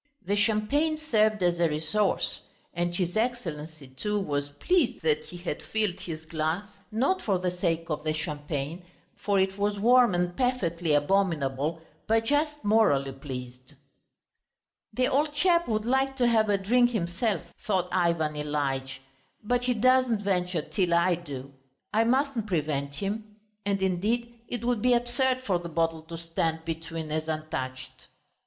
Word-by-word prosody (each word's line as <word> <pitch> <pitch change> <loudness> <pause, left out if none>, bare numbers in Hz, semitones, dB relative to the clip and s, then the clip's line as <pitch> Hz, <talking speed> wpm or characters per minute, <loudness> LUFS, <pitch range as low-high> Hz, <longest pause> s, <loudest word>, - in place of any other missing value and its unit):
The 200 +3 +1
champagne 225 +10 +2
served 215 -9 +2
as 175 -1 +2
a 170 -1 +3
resource, 160 +7 0 0.3
and 175 0 -1
his 175 0 -1
Excellency, 165 - -3
too, 210 +11 -2
was 145 -6 -2
pleased 255 - +1
that 155 -1 +1
he 175 - -10
had 175 -4 -4
filled 210 -4 -1
his 160 -4 -7
glass 160 +4 -1 0.3
not 275 - +1
for 195 -3 +1
the 180 0 -1
sake 170 -2 -1
of 150 - -2
the 155 - 0
champagne, 150 +1 -4 0.3
for 200 -1 +1
it 190 +1 0
was 205 0 0
warm 240 -2 +5
and 175 0 0
perfectly 175 - 0
abominable, 155 -2 +1 0.2
but 225 +1 +2
just 295 +3 0
morally 205 -11 +3
pleased. 130 0 -8 1.2
"The 255 0 +1
old 295 +2 +1
chap 345 +2 +3
would 215 -1 0
like 265 +2 +1
to 250 - +3
have 220 -2 +3
a 200 - +3
drink 240 +5 +3
himself," 180 -3 -2
thought 185 -4 +1
Ivan 170 -4 +1
Ilyitch, 135 -3 -2 0.4
"but 245 +3 0
he 250 -1 +2
doesn't 255 -2 +3
venture 180 -4 0
till 180 -3 +1
I 175 +1 +4
do. 140 -5 -7 0.4
I 225 +2 +4
mustn't 255 -2 +1
prevent 145 -5 -1
him. 210 +5 -4 0.3
And 195 -1 0
indeed 220 +6 0
it 240 0 -4
would 240 -3 +1
be 250 +1 +4
absurd 255 +2 +1
for 185 -7 +1
the 170 0 -7
bottle 165 0 0
to 165 +1 -8
stand 165 -1 -2
between 165 -1 -5
as 155 +1 -2
untouched." 130 -5 -5
180 Hz, 155 wpm, -28 LUFS, 155-225 Hz, 1.2 s, warm